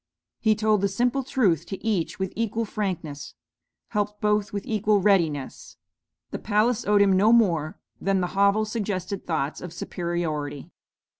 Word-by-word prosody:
He 220 Hz, -1 st, +3 dB
told 215 Hz, -1 st, +2 dB
the 200 Hz, -, +3 dB
simple 245 Hz, +7 st, 0 dB
truth 215 Hz, -, +1 dB
to 195 Hz, -, -7 dB
each 200 Hz, -7 st, -1 dB
with 190 Hz, -1 st, -3 dB
equal 230 Hz, 0 st, -1 dB
frankness; 175 Hz, -9 st, -4 dB, 0.5 s
helped 210 Hz, -1 st, -2 dB
both 210 Hz, -1 st, +1 dB
with 200 Hz, -1 st, -4 dB
equal 210 Hz, -1 st, +2 dB
readiness. 185 Hz, -, 0 dB, 0.5 s
The -, -, -4 dB
palace 215 Hz, +2 st, +1 dB
owed 205 Hz, -1 st, +5 dB
him 195 Hz, -1 st, +3 dB
no 205 Hz, +4 st, +4 dB
more 175 Hz, -7 st, +2 dB, 0.2 s
than 195 Hz, -1 st, +1 dB
the 180 Hz, -1 st, -2 dB
hovel 200 Hz, +2 st, +3 dB
suggested 200 Hz, -3 st, -4 dB
thoughts 155 Hz, -4 st, -2 dB
of 180 Hz, -, -7 dB
superiority. 160 Hz, -6 st, -4 dB
200 Hz, 150 wpm, -25 LUFS, 175-215 Hz, 0.5 s, owed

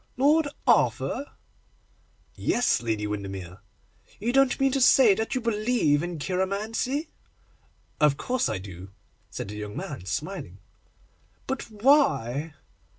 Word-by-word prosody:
'Lord 295 Hz, +4 st, +4 dB, 0.2 s
Arthur?' 285 Hz, -, +2 dB, 1.1 s
'Yes, 240 Hz, -, +1 dB
Lady 110 Hz, -3 st, -2 dB
Windermere.' 95 Hz, -3 st, -6 dB, 0.6 s
'You 235 Hz, +4 st, -1 dB
don't 270 Hz, -1 st, +3 dB
mean 270 Hz, 0 st, +3 dB
to 275 Hz, 0 st, 0 dB
say 250 Hz, -4 st, +7 dB
that 220 Hz, +6 st, -2 dB
you 255 Hz, -, 0 dB
believe 215 Hz, -9 st, +1 dB
in 175 Hz, 0 st, -4 dB
cheiromancy?' 210 Hz, -, -2 dB, 0.9 s
'Of 150 Hz, -2 st, +4 dB
course 255 Hz, -1 st, -1 dB
I -, -, -2 dB
do,' 95 Hz, -1 st, -10 dB, 0.4 s
said -, -, -6 dB
the 105 Hz, -, -7 dB
young 105 Hz, 0 st, -6 dB
man, 90 Hz, -, -6 dB
smiling. 100 Hz, -, -5 dB, 0.9 s
'But 265 Hz, -2 st, -4 dB
why? 205 Hz, -, +2 dB
195 Hz, 120 wpm, -26 LUFS, -, 1.1 s, say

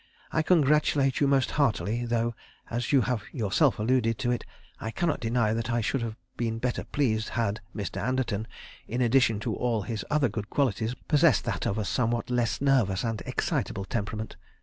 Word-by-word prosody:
I, 160 Hz, -, +2 dB
congratulate 150 Hz, -4 st, +3 dB
you 140 Hz, -, +3 dB
most 135 Hz, -1 st, +2 dB
heartily, 120 Hz, -, +1 dB
though 120 Hz, 0 st, 0 dB, 0.4 s
as 120 Hz, +1 st, -1 dB
you 140 Hz, -3 st, +5 dB
have 125 Hz, -3 st, -1 dB
yourself 120 Hz, -, +2 dB
alluded 115 Hz, 0 st, +1 dB
to 125 Hz, -2 st, 0 dB
it, 120 Hz, -, -1 dB, 0.4 s
I 110 Hz, -, -4 dB
cannot 160 Hz, +6 st, 0 dB
deny 115 Hz, -2 st, +1 dB
that 115 Hz, 0 st, -2 dB
I 120 Hz, 0 st, +1 dB
should 125 Hz, +4 st, -1 dB
have 115 Hz, -2 st, -3 dB, 0.2 s
been 115 Hz, -1 st, -1 dB
better 125 Hz, +1 st, -2 dB
pleased 110 Hz, -6 st, 0 dB
had 110 Hz, -3 st, -1 dB
Mr. 100 Hz, -3 st, -4 dB
Anderton, 115 Hz, -4 st, -1 dB, 0.4 s
in 120 Hz, -, -3 dB
addition 120 Hz, -3 st, +3 dB
to -, -, -2 dB
all 115 Hz, -4 st, 0 dB
his 110 Hz, 0 st, -4 dB
other 150 Hz, -3 st, +3 dB
good 105 Hz, -1 st, -5 dB
qualities, 120 Hz, -3 st, 0 dB
possessed 150 Hz, -2 st, +4 dB
that -, -, -2 dB
of 100 Hz, -, -1 dB
a 110 Hz, -, -1 dB
somewhat 120 Hz, +2 st, 0 dB
less 120 Hz, -1 st, 0 dB
nervous 125 Hz, -9 st, +2 dB
and 115 Hz, -2 st, -2 dB
excitable 95 Hz, -, -1 dB
temperament. 110 Hz, 0 st, -4 dB
120 Hz, 180 wpm, -28 LUFS, 110-130 Hz, 0.4 s, you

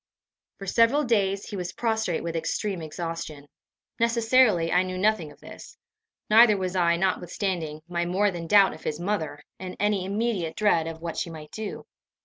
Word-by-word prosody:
For 195 Hz, -, -8 dB
several 230 Hz, +9 st, +3 dB
days 200 Hz, -5 st, +1 dB
he -, -, -5 dB
was 180 Hz, -2 st, -4 dB
prostrate 220 Hz, -7 st, -1 dB
with 170 Hz, 0 st, -4 dB
extreme 185 Hz, +3 st, -2 dB
exhaustion. 160 Hz, -2 st, -6 dB, 0.5 s
Necessarily, 230 Hz, -6 st, +3 dB
I 180 Hz, -, +4 dB
knew 185 Hz, 0 st, -4 dB
nothing 185 Hz, -6 st, +1 dB
of 145 Hz, -, -18 dB
this; -, -, -12 dB, 0.5 s
neither 215 Hz, -1 st, +6 dB
was 185 Hz, -1 st, -3 dB
I, 170 Hz, -2 st, +3 dB
notwithstanding 175 Hz, -3 st, -2 dB
my 175 Hz, -1 st, -2 dB
more 200 Hz, +3 st, +2 dB
than 170 Hz, -2 st, -6 dB
doubt 200 Hz, +1 st, +5 dB
of 155 Hz, -, -12 dB
his 150 Hz, 0 st, -3 dB
mother, 175 Hz, -5 st, -3 dB, 0.2 s
in 185 Hz, -1 st, -7 dB
any 205 Hz, -2 st, +1 dB
immediate 200 Hz, -4 st, -2 dB
dread 170 Hz, -6 st, +2 dB
of 165 Hz, 0 st, -7 dB
what 170 Hz, -1 st, -4 dB
she -, -, -2 dB
might 155 Hz, -2 st, -10 dB
do. 220 Hz, -1 st, -6 dB
185 Hz, 170 wpm, -26 LUFS, 165-210 Hz, 0.5 s, neither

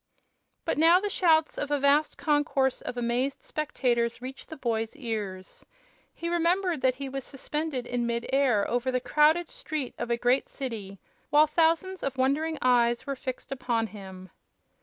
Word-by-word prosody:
But -, -, 0 dB
now 335 Hz, +3 st, +7 dB
the 410 Hz, +1 st, -2 dB
shouts 320 Hz, -5 st, +3 dB
of 290 Hz, -, -2 dB
a 290 Hz, -, +2 dB
vast 285 Hz, +2 st, +3 dB
concourse 290 Hz, -3 st, +1 dB
of 245 Hz, -, -6 dB
amazed 245 Hz, +3 st, -1 dB
spectators 240 Hz, -6 st, -1 dB
reached 260 Hz, +2 st, -9 dB
the 315 Hz, -, -8 dB
boy's 225 Hz, -3 st, -2 dB
ears. 210 Hz, -8 st, -5 dB, 0.5 s
He 335 Hz, -, -6 dB
remembered 345 Hz, -1 st, +1 dB
that 255 Hz, -1 st, +3 dB
he 275 Hz, +1 st, -5 dB
was 270 Hz, 0 st, -5 dB
suspended 285 Hz, -1 st, -4 dB
in 245 Hz, -1 st, -1 dB
mid 235 Hz, 0 st, -2 dB
air 255 Hz, -7 st, +3 dB
over 245 Hz, +2 st, 0 dB
the 255 Hz, -, +1 dB
crowded 305 Hz, +5 st, +3 dB
street 300 Hz, -5 st, -4 dB
of 240 Hz, -, -3 dB
a 235 Hz, -, +1 dB
great 245 Hz, +3 st, +1 dB
city, 220 Hz, -8 st, -6 dB, 0.3 s
while 300 Hz, +1 st, +6 dB
thousands 330 Hz, +4 st, +1 dB
of 270 Hz, -1 st, -3 dB
wondering 300 Hz, +5 st, +1 dB
eyes 240 Hz, -1 st, +3 dB
were 280 Hz, -1 st, -3 dB
fixed 255 Hz, 0 st, -6 dB
upon 245 Hz, -4 st, 0 dB
him. 190 Hz, -4 st, -10 dB
265 Hz, 165 wpm, -28 LUFS, 235-305 Hz, 0.5 s, now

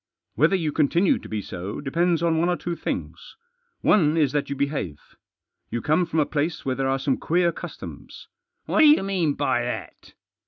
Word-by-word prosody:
Whether 155 Hz, -, +3 dB
you 160 Hz, -5 st, -1 dB
continue 170 Hz, -, +2 dB
to -, -, -12 dB
be 105 Hz, -2 st, -3 dB
so 90 Hz, +3 st, -6 dB
depends 170 Hz, +4 st, 0 dB
on 165 Hz, -1 st, +2 dB
one 170 Hz, +2 st, +2 dB
or 175 Hz, -, +1 dB
two 175 Hz, -1 st, -4 dB
things. -, -, -5 dB, 0.5 s
One 160 Hz, -6 st, +3 dB
is 150 Hz, -4 st, +3 dB
that 145 Hz, -1 st, -1 dB
you 140 Hz, -, -2 dB
behave. 140 Hz, -, -2 dB, 0.7 s
You 120 Hz, -, -2 dB
come 160 Hz, +6 st, +1 dB
from 160 Hz, -1 st, -1 dB
a 150 Hz, -, +3 dB
place 155 Hz, +3 st, -2 dB
where 130 Hz, -, 0 dB
there 135 Hz, +1 st, -1 dB
are 135 Hz, -, +1 dB
some 135 Hz, 0 st, 0 dB
queer 175 Hz, +1 st, +1 dB
customs." -, -, -9 dB, 0.2 s
" -, -, -54 dB
What -, -, 0 dB
do 310 Hz, -, +8 dB
you 300 Hz, -7 st, +6 dB
mean 180 Hz, -7 st, 0 dB
by 140 Hz, -4 st, +1 dB
that 120 Hz, 0 st, -6 dB
155 Hz, 200 wpm, -24 LUFS, 135-170 Hz, 0.7 s, do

